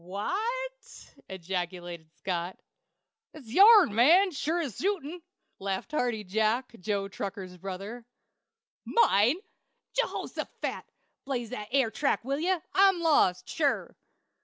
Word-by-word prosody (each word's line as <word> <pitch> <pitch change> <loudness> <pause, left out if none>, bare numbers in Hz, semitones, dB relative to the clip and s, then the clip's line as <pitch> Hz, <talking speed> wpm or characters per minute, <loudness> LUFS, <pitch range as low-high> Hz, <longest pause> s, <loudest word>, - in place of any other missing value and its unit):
"Wha 195 - -4 0.5
t!" - - -16
ejaculated 175 -2 -5
Scott. 180 -1 -3 0.8
"It's 270 -8 -12
your'n, 405 - +8
man, 340 - +5
sure 315 +3 -1
as 280 - -4
shootin'!" 355 -4 -2 0.4
laughed 195 +7 -3
Hearty 245 -7 -1
Jack, 220 +6 0
Joe 200 +1 -2
Tucker's 195 -2 -6
brother. 195 +6 -7 0.8
"Mine? 240 - +4 0.6
Jehoshaphat! - - -3 0.4
Blaze 245 -4 -3
that 210 -4 -5
air 260 -4 +2
track, 275 -3 0
will 275 +2 -1
ye? 350 +4 +1 0.2
I'm 385 -2 +5
lost, 285 - +3
sure." 290 -3 -1
230 Hz, 110 wpm, -28 LUFS, 190-310 Hz, 0.8 s, your'n